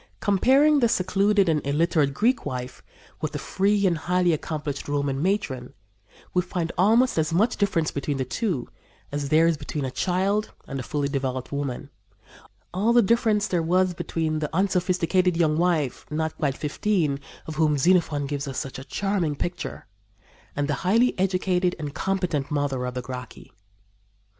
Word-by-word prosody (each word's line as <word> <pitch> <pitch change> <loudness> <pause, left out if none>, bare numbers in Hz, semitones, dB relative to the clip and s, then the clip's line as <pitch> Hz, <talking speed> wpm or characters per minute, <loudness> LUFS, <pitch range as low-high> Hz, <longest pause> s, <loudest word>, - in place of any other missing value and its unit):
Comparing 270 +9 +4
the 235 -3 +3
secluded 200 -1 +2
and 155 -2 +2
illiterate 150 0 +2
Greek 235 - +1
wife 125 -3 -5 0.4
with - - -3
the - - -2
free 200 +1 +1
and 170 -4 +2
highly 180 0 +2
accomplished 150 -2 -4
Roman 140 -1 -1
matron, 150 -10 -2 0.6
we 180 - +3
find 175 -1 -3
almost 225 +3 +3
as 155 0 0
much 205 +8 +2
difference 190 -6 0
between 140 0 -2
the 130 - -1
two 170 - -2 0.4
as 145 -1 -3
there 160 +2 +5
is 165 -2 +2
between 145 -1 -4
a 130 - -3
child 195 +7 0
and 135 -1 -4
a - - -2
fully 145 +3 -2
developed 130 -2 -3
woman 140 0 -4 0.8
all 210 +6 +2
the 240 -1 +6
difference 215 -1 +2
there 175 -2 0
was 180 +2 +2
between 160 -2 -2
the 150 -1 -2
unsophisticated 180 -1 +1
young 155 -3 +3
wife, 160 -6 0
not 160 +1 -2
quite 140 -3 -1
fifteen, 155 -2 0 0.3
of 155 -1 -7
whom 155 -2 +3
Xenophon 160 -2 +2
gives 140 0 -3
us 135 - -5
such 135 -1 -4
a - - -8
charming 185 -1 -1
picture, 175 +5 -4 0.7
and 145 0 0
the 150 - 0
highly 230 +7 +3
educated 185 -1 +1
and 150 -3 -5
competent 180 -6 -1
mother 140 -4 -1
of 125 - -5
the 125 - -3
Gracchi. 125 -1 -8
165 Hz, 165 wpm, -25 LUFS, 145-190 Hz, 0.8 s, the